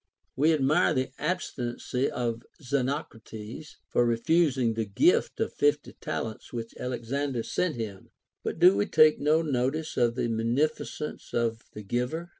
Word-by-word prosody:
AVe 150 Hz, +5 st, +4 dB
admire 155 Hz, +4 st, +3 dB
the 130 Hz, 0 st, -1 dB
abstinency 130 Hz, -6 st, -2 dB
of 115 Hz, -1 st, -2 dB, 0.2 s
Xenocrates 130 Hz, -2 st, -4 dB
for 120 Hz, -, +2 dB
refusing 125 Hz, +1 st, +2 dB
the 110 Hz, 0 st, -1 dB
gift 100 Hz, -1 st, +2 dB
of -, -, -1 dB
fifty 145 Hz, 0 st, +1 dB
talents 110 Hz, -1 st, -4 dB
which 115 Hz, -1 st, -5 dB
Alexander 125 Hz, +1 st, -2 dB
sent 180 Hz, +5 st, -1 dB
him; 105 Hz, -5 st, -6 dB, 0.3 s
but -, -, -3 dB
do 180 Hz, +3 st, +7 dB
we 205 Hz, -, +1 dB
take 155 Hz, -3 st, +5 dB
no 155 Hz, +3 st, +3 dB
notice 150 Hz, +2 st, -1 dB
of 120 Hz, -1 st, +2 dB
the 125 Hz, -, 0 dB
munificence 125 Hz, +7 st, -2 dB
of 115 Hz, -1 st, 0 dB
the 105 Hz, -, -8 dB
giver 125 Hz, -, -2 dB
130 Hz, 140 wpm, -28 LUFS, 115-155 Hz, 0.3 s, do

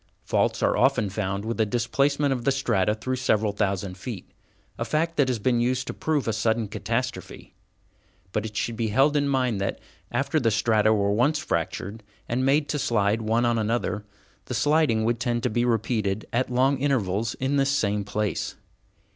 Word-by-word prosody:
Faults -, -, 0 dB
are -, -, +3 dB
often 105 Hz, -3 st, +2 dB
found 100 Hz, 0 st, -2 dB
with 115 Hz, 0 st, -1 dB
a -, -, +6 dB
displacement 140 Hz, +5 st, +1 dB
of 125 Hz, -2 st, -4 dB
the 135 Hz, -, +3 dB
strata 110 Hz, -7 st, +1 dB
through 130 Hz, +4 st, -3 dB
several 110 Hz, -4 st, +1 dB
thousand 100 Hz, -2 st, -2 dB
feet, 110 Hz, -4 st, -6 dB, 0.5 s
a -, -, 0 dB
fact 165 Hz, +2 st, -1 dB
that 140 Hz, -, +3 dB
has 125 Hz, -2 st, 0 dB
been 120 Hz, +3 st, +1 dB
used 125 Hz, +1 st, 0 dB
to -, -, -5 dB
prove 155 Hz, -5 st, -1 dB
a 115 Hz, -, +1 dB
sudden 110 Hz, +1 st, 0 dB
catastrophe. 120 Hz, +4 st, -4 dB, 0.8 s
But 105 Hz, -, -1 dB
it 105 Hz, -1 st, -6 dB
should 115 Hz, +3 st, -1 dB
be 115 Hz, 0 st, -1 dB
held 135 Hz, +7 st, +3 dB
in 145 Hz, -1 st, +2 dB
mind 125 Hz, -7 st, 0 dB
that, 95 Hz, -, -1 dB, 0.3 s
after -, -, +1 dB
the 115 Hz, -, +2 dB
strata 110 Hz, 0 st, +3 dB
were 100 Hz, -2 st, +2 dB
once 125 Hz, +9 st, +2 dB
fractured 95 Hz, -, -3 dB, 0.3 s
and 125 Hz, +2 st, -1 dB
made 145 Hz, +3 st, +3 dB
to 150 Hz, -, -1 dB
slide 110 Hz, -3 st, +1 dB
one 115 Hz, +2 st, +1 dB
on 120 Hz, -1 st, +2 dB
another, 110 Hz, -1 st, -1 dB, 0.4 s
the 125 Hz, -, -4 dB
sliding 145 Hz, -3 st, +2 dB
would 120 Hz, 0 st, 0 dB
tend 120 Hz, -2 st, -1 dB
to 125 Hz, -, 0 dB
be 120 Hz, +2 st, +1 dB
repeated 110 Hz, -3 st, 0 dB
at 125 Hz, +2 st, +1 dB
long 130 Hz, +2 st, +2 dB
intervals 115 Hz, -6 st, 0 dB
in 135 Hz, +2 st, -1 dB
this 135 Hz, 0 st, +2 dB
same 105 Hz, -7 st, +1 dB
place. 105 Hz, -2 st, -2 dB
115 Hz, 190 wpm, -25 LUFS, 105-130 Hz, 0.8 s, a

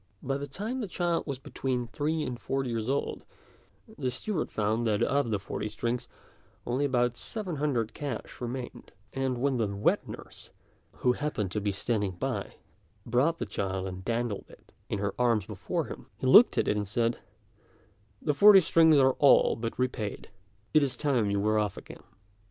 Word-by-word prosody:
By 135 Hz, +1 st, -1 dB
the 140 Hz, 0 st, -5 dB
time 215 Hz, -, -4 dB
the 215 Hz, -, -3 dB
child 175 Hz, -2 st, -1 dB
was 140 Hz, -3 st, -3 dB
between 130 Hz, -2 st, -3 dB
three 150 Hz, +6 st, -2 dB
and 125 Hz, -3 st, -4 dB
four 135 Hz, +5 st, -1 dB
years 115 Hz, -1 st, -2 dB
old, 140 Hz, +1 st, -2 dB, 0.8 s
the 130 Hz, -3 st, 0 dB
steward 180 Hz, -, -3 dB
found 110 Hz, +2 st, 0 dB
that 105 Hz, -2 st, +2 dB
of 140 Hz, -3 st, +1 dB
the 105 Hz, -, +1 dB
forty 100 Hz, +2 st, -4 dB
strings 120 Hz, +3 st, -3 dB, 0.6 s
only 130 Hz, +4 st, 0 dB
about 120 Hz, -3 st, +1 dB
seven 190 Hz, -8 st, -4 dB
hundred 125 Hz, -7 st, 0 dB
cash 140 Hz, -5 st, -6 dB
remained; 125 Hz, +1 st, -6 dB, 0.2 s
and 130 Hz, -2 st, -1 dB
when 135 Hz, +1 st, +1 dB
the 115 Hz, -3 st, +1 dB
wet 100 Hz, +1 st, 0 dB
nurse, -, -, -10 dB, 0.6 s
who 125 Hz, -, +6 dB
happened 125 Hz, -10 st, -2 dB
to 105 Hz, -, -1 dB
be 100 Hz, 0 st, 0 dB
standing 100 Hz, -1 st, -1 dB
by, 105 Hz, +2 st, -3 dB, 0.5 s
brought 130 Hz, +8 st, +2 dB
the -, -, -3 dB
child 95 Hz, -1 st, -3 dB
and 95 Hz, 0 st, -6 dB
dandled 115 Hz, -1 st, -2 dB
it -, -, -18 dB, 0.2 s
in -, -, -1 dB
her 100 Hz, 0 st, -2 dB
arms 115 Hz, -5 st, +2 dB
before -, -, -3 dB
him, -, -, -9 dB
he -, -, -5 dB
looked 210 Hz, -, +7 dB
at -, -, +2 dB
it -, -, +2 dB
and 105 Hz, -1 st, -2 dB
said, 115 Hz, +3 st, 0 dB, 1.0 s
"The 150 Hz, -, +2 dB
forty 200 Hz, +6 st, +8 dB
strings 160 Hz, -2 st, +5 dB
are 130 Hz, -1 st, +5 dB
all 140 Hz, -, +6 dB
but 115 Hz, 0 st, -4 dB
repaid; 125 Hz, -5 st, -3 dB, 0.4 s
it 155 Hz, -, +6 dB
is 135 Hz, -3 st, 0 dB
time 125 Hz, -8 st, +1 dB
you 100 Hz, 0 st, +1 dB
were 110 Hz, +1 st, +2 dB
off 105 Hz, -2 st, -1 dB
again." -, -, -11 dB
125 Hz, 180 wpm, -29 LUFS, 110-140 Hz, 1.0 s, forty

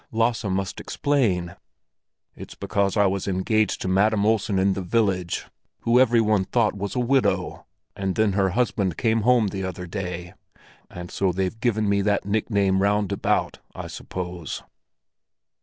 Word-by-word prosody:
"Lasse 115 Hz, 0 st, 0 dB
must 95 Hz, -1 st, -2 dB
explain." 95 Hz, -12 st, 0 dB, 0.8 s
"It's -, -, -10 dB
because 100 Hz, 0 st, -1 dB
I 100 Hz, -, +5 dB
was 95 Hz, 0 st, -1 dB
engaged 100 Hz, +2 st, 0 dB
to -, -, -3 dB
Madam 100 Hz, +2 st, +2 dB
Olsen 105 Hz, -2 st, +1 dB
in 95 Hz, +1 st, +3 dB
the 95 Hz, -, -4 dB
village, 95 Hz, -2 st, 0 dB, 0.4 s
who 120 Hz, +2 st, +3 dB
every 120 Hz, -2 st, +4 dB
one 105 Hz, -3 st, +2 dB
thought 115 Hz, -1 st, +1 dB
was 100 Hz, 0 st, -4 dB
a -, -, 0 dB
widow; 130 Hz, +2 st, 0 dB, 0.3 s
and 95 Hz, -1 st, -2 dB
then 110 Hz, -2 st, +2 dB
her 95 Hz, -1 st, +2 dB
husband 100 Hz, -8 st, 0 dB
came 115 Hz, -1 st, +1 dB
home 120 Hz, -2 st, +3 dB
the 95 Hz, 0 st, -4 dB
other 90 Hz, -1 st, -5 dB
day. 90 Hz, -2 st, -5 dB, 0.6 s
And 90 Hz, 0 st, -8 dB
so 95 Hz, -2 st, +1 dB
they've 95 Hz, +4 st, -2 dB
given 110 Hz, -3 st, +1 dB
me 100 Hz, 0 st, +2 dB
that 100 Hz, 0 st, 0 dB
nickname 100 Hz, -2 st, +1 dB
round 100 Hz, 0 st, +1 dB
about, -, -, 0 dB, 0.2 s
I -, -, -6 dB
suppose." 90 Hz, -2 st, -6 dB
100 Hz, 155 wpm, -24 LUFS, 95-110 Hz, 0.8 s, I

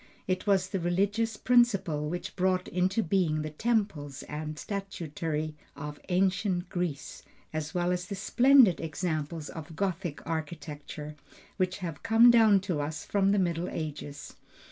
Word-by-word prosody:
It 185 Hz, +2 st, -1 dB
was 190 Hz, -2 st, +3 dB
the 190 Hz, -, -2 dB
religious 200 Hz, +6 st, 0 dB
principle 200 Hz, -13 st, +2 dB
which 175 Hz, +2 st, -5 dB
brought 185 Hz, -1 st, +1 dB
into 185 Hz, +5 st, +1 dB
being 160 Hz, -4 st, +1 dB
the 155 Hz, -, -4 dB
temples 165 Hz, -, -1 dB
and 155 Hz, +1 st, -5 dB
statuary 160 Hz, -5 st, -4 dB, 0.2 s
of 145 Hz, +1 st, -7 dB
ancient 185 Hz, 0 st, +1 dB
Greece, 175 Hz, -6 st, -3 dB, 0.3 s
as 155 Hz, 0 st, -4 dB
well 175 Hz, 0 st, +1 dB
as 180 Hz, 0 st, -2 dB
the 200 Hz, -, -4 dB
splendid 245 Hz, +1 st, +5 dB
examples 155 Hz, -1 st, -3 dB
of 160 Hz, -1 st, -8 dB
Gothic 180 Hz, -4 st, -3 dB
architecture, 150 Hz, -1 st, -5 dB, 0.4 s
which 185 Hz, -1 st, 0 dB
have 165 Hz, -3 st, -6 dB
come 230 Hz, +1 st, +7 dB
down 220 Hz, -4 st, +6 dB
to 180 Hz, -6 st, -2 dB
us 155 Hz, +2 st, -4 dB
from 195 Hz, -1 st, +2 dB
the 205 Hz, -, +3 dB
middle 175 Hz, -2 st, 0 dB
ages. 150 Hz, -2 st, -6 dB
180 Hz, 145 wpm, -29 LUFS, 155-195 Hz, 0.4 s, come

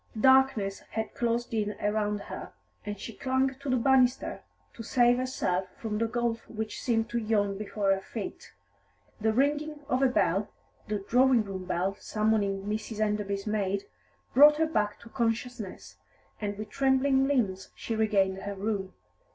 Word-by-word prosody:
Darkness 260 Hz, -6 st, +4 dB
had 220 Hz, 0 st, -5 dB
closed 235 Hz, 0 st, -1 dB
in 210 Hz, -2 st, -1 dB
around 210 Hz, 0 st, 0 dB
her, -, -, -8 dB, 0.3 s
and 205 Hz, -1 st, -4 dB
she 230 Hz, -, -7 dB
clung 260 Hz, +3 st, 0 dB
to 280 Hz, 0 st, -5 dB
the 255 Hz, -, +3 dB
banisters 255 Hz, +1 st, +3 dB, 0.3 s
to -, -, -9 dB
save 240 Hz, +1 st, +3 dB
herself 190 Hz, -8 st, -1 dB
from 215 Hz, -2 st, -3 dB
the 230 Hz, -, +1 dB
gulf 235 Hz, -1 st, -2 dB
which 220 Hz, -1 st, -5 dB
seemed 225 Hz, -2 st, +1 dB
to 235 Hz, -, 0 dB
yawn 210 Hz, -3 st, +1 dB
before 200 Hz, -1 st, -1 dB
her 195 Hz, -, -3 dB
feet. -, -, -7 dB, 0.7 s
The 220 Hz, +1 st, +2 dB
ringing 295 Hz, +5 st, 0 dB
of 255 Hz, -2 st, +1 dB
a 270 Hz, -, +6 dB
bell, 200 Hz, -4 st, +1 dB, 0.4 s
the 205 Hz, -2 st, -3 dB
drawing 250 Hz, -1 st, +4 dB
room 190 Hz, -2 st, -6 dB
bell 185 Hz, +2 st, -1 dB
summoning 210 Hz, -2 st, 0 dB
Mrs. 215 Hz, +1 st, -4 dB
Enderby's 210 Hz, -2 st, -1 dB
maid, 200 Hz, -2 st, -1 dB, 0.5 s
brought 295 Hz, +3 st, +8 dB
her 320 Hz, -, +3 dB
back 210 Hz, -9 st, -1 dB
to 235 Hz, -, -13 dB
consciousness, 230 Hz, -3 st, -3 dB, 0.4 s
and 205 Hz, -1 st, -3 dB
with 215 Hz, 0 st, -7 dB
trembling 270 Hz, +1 st, +3 dB
limbs 200 Hz, -9 st, 0 dB
she 225 Hz, -, -4 dB
regained 200 Hz, -3 st, +2 dB
her 200 Hz, +1 st, -5 dB
room. 195 Hz, -1 st, -3 dB
220 Hz, 160 wpm, -29 LUFS, 205-250 Hz, 0.7 s, brought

